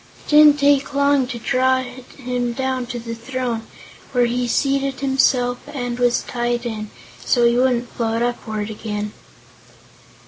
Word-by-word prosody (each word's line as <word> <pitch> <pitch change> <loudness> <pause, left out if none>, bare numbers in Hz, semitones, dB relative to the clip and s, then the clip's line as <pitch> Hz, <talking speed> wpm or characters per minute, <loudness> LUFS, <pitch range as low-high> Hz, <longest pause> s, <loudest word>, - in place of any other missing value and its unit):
It - - -14
didn't 300 -1 +7
take 280 -1 +2
long 280 -2 +3
to 250 -2 -5
draw 260 +2 +1
him 250 -1 -5
down 260 -1 -2
to 245 0 -5
the 230 0 -6
throne, 235 -1 -4 0.5
where 245 -1 +3
he 245 +1 -1
seated 275 +2 0
himself 260 -2 +2
and 245 -4 -4
was 245 -1 +2
tied 240 0 -2
in, 215 -2 -4 0.3
so 240 -2 +3
he 235 0 +4
wouldn't 245 -1 +2
float 230 0 -2
upward 220 -3 -3
again. 210 -1 -5
245 Hz, 145 wpm, -20 LUFS, 235-265 Hz, 0.5 s, didn't